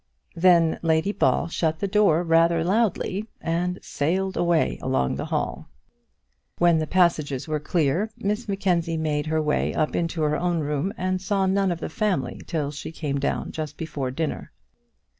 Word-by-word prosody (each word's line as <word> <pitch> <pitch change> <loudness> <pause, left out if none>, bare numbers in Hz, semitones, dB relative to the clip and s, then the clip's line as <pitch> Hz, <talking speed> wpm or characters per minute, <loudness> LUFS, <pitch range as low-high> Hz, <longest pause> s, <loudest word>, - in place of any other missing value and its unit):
Then 170 -2 +4
Lady 160 +4 +2
Ball 190 - +1
shut 160 -1 -1
the 200 - -2
door 195 -5 +3
rather 165 0 +3
loudly, 205 +1 0
and 175 +2 -1
sailed 185 +6 -1
away 170 -2 +1
along 130 - 0
the - - -4
hall. - - -3 0.9
When 170 -2 +4
the 155 - -2
passages 155 -7 +1
were 155 -1 -1
clear, 165 +5 0
Miss 210 +4 -2
Mackenzie 180 -4 0
made 150 -1 -1
her 155 0 +1
way 150 - 0
up 155 - 0
into 165 -1 -1
her 150 0 +2
own 175 -2 0
room, 150 +5 -1
and 185 0 -1
saw 195 0 +1
none 190 0 +2
of 170 - -3
the - - -2
family 205 +3 -1
till 150 -5 -2
she 150 +1 -7
came 145 -4 -3
down 140 - -2
just 155 -2 -5
before 150 -5 -3
dinner. 155 +4 -4
165 Hz, 165 wpm, -24 LUFS, 155-185 Hz, 0.9 s, Then